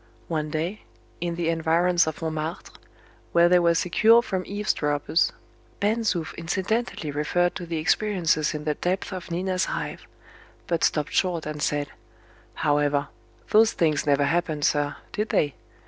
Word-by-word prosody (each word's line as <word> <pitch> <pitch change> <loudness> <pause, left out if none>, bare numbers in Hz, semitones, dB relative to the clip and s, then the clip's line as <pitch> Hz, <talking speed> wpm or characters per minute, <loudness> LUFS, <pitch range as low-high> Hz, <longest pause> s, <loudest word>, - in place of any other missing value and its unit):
One 155 -2 -1
day, 170 +7 -3 0.4
in 170 0 -2
the 170 -1 -1
environs 165 +1 +2
of 160 +1 -4
Montmartre, 160 +1 -4 0.6
where 170 0 +6
they 180 +1 +5
were 170 -1 +3
secure 220 +8 +4
from 190 -6 -2
eavesdroppers, 160 -6 0 0.5
Ben 210 +3 +1
Zoof 180 -8 -1
incidentally 190 0 -2
referred 175 +5 +1
to 175 - -7
the 165 -1 -2
experiences 165 -3 +1
in 150 - -5
the 150 0 0
depths 185 +5 -2
of 185 -2 -7
Nina's 185 +2 0
Hive; - - -5 0.6
but 170 -2 -1
stopped 150 -2 +1
short 175 -4 +1
and 150 -1 -5
said, 145 -1 0 0.7
"However, 145 -1 +1 0.4
those 220 +1 +5
things 155 -3 +1
never 145 0 +3
happened, 160 -1 0
sir, 145 -1 +1 0.2
did 210 +1 -2
they?" 145 -3 +1
170 Hz, 145 wpm, -25 LUFS, 150-185 Hz, 0.7 s, where